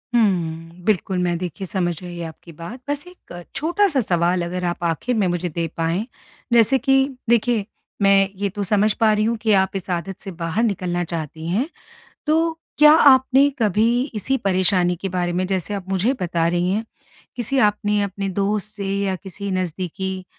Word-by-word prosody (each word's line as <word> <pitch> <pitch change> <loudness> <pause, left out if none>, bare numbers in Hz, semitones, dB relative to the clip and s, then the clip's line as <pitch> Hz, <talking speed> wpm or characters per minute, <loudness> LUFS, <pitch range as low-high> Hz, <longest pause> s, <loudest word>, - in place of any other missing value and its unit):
हुँ, 170 -5 0
बिल्कुल 190 -3 +1
मैं 175 -1 0
देखिए 180 +1 -5
समझ 175 -4 -1
गई 175 -1 -7
आपकी 165 0 -9
बात। 170 - -9
बस 290 +3 -2
एक 175 - -12
छोटा-सा 335 +1 +2
सवाल 175 -3 +1
अगर 180 +1 -4
आप 175 0 -3
आखिर 170 +9 -1
में 205 -4 +2
मुझे 175 0 -1
दे 165 +1 -2
पाएँ। 165 +6 0 0.5
जैसे 235 +3 +5
कि 270 -1 +3 0.3
देखिए 235 -2 +2 0.4
मैं 195 0 +5
ये 200 0 -1
तो 205 +1 -4
समझ 210 +2 +2
पा 220 -1 +3
रही 210 0 +1
हूँ 230 0 0
कि 220 - +1
आप 190 +1 -3
इस 190 -1 -5
आदत 180 +2 -3
से 195 - -7
बाहर 165 +7 0
निकलना 180 -5 -1
चाहती 160 -1 -5
हैं। 230 - 0 0.6
तो 325 +1 +1 0.2
क्या 300 0 +8 0.2
आपने 265 +2 +4
कभी 215 +2 +3 0.3
इसी 265 +6 0
परेशानी 185 -2 +2
के 195 - -2
बारे 175 -1 -1
में 185 +1 0
जैसे 190 +1 -2
आप 190 -2 -6
मुझे 195 +7 +1
बता 170 -1 0
रहीं 175 +2 +1
हैं 220 +3 -1 0.5
किसी 245 +3 0
आपने 210 0 -1
अपने 200 0 -3
दोस्त 205 +2 -1
से 200 -2 -4 0.2
या 190 -1 -1
किसी 200 +2 -7
नज़दीकी 185 +1 -3
195 Hz, 180 wpm, -21 LUFS, 175-215 Hz, 0.6 s, क्या